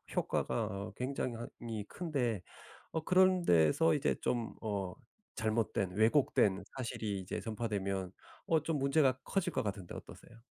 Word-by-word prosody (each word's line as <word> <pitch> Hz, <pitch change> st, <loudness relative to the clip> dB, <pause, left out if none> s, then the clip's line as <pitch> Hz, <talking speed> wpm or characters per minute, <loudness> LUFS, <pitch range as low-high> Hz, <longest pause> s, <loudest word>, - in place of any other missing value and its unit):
효과가 115 Hz, -, 0 dB
어 100 Hz, -1 st, -5 dB
굉장이 130 Hz, -1 st, -2 dB
한 120 Hz, +1 st, -6 dB
히 115 Hz, -3 st, -4 dB
큰데 130 Hz, -, -1 dB, 0.5 s
어 160 Hz, -, -1 dB
그런 185 Hz, +1 st, +5 dB
데서 85 Hz, -, +5 dB
이제 145 Hz, 0 st, +1 dB
좀 120 Hz, -2 st, -1 dB
어 100 Hz, -4 st, -2 dB, 0.4 s
잘못된 110 Hz, -5 st, 0 dB
왜곡된 110 Hz, -4 st, +3 dB
사실이 110 Hz, -5 st, -2 dB
이제 95 Hz, 0 st, -4 dB
전파되면 100 Hz, -5 st, -2 dB, 0.4 s
어 160 Hz, -, +4 dB
좀 160 Hz, -1 st, 0 dB
문제가 140 Hz, -1 st, +3 dB
커질 195 Hz, -3 st, 0 dB
것 -, -, 0 dB
같은데 100 Hz, -4 st, -4 dB
어떠세요? 115 Hz, -, -11 dB
115 Hz, 285 characters per minute, -34 LUFS, 100-140 Hz, 0.5 s, 그런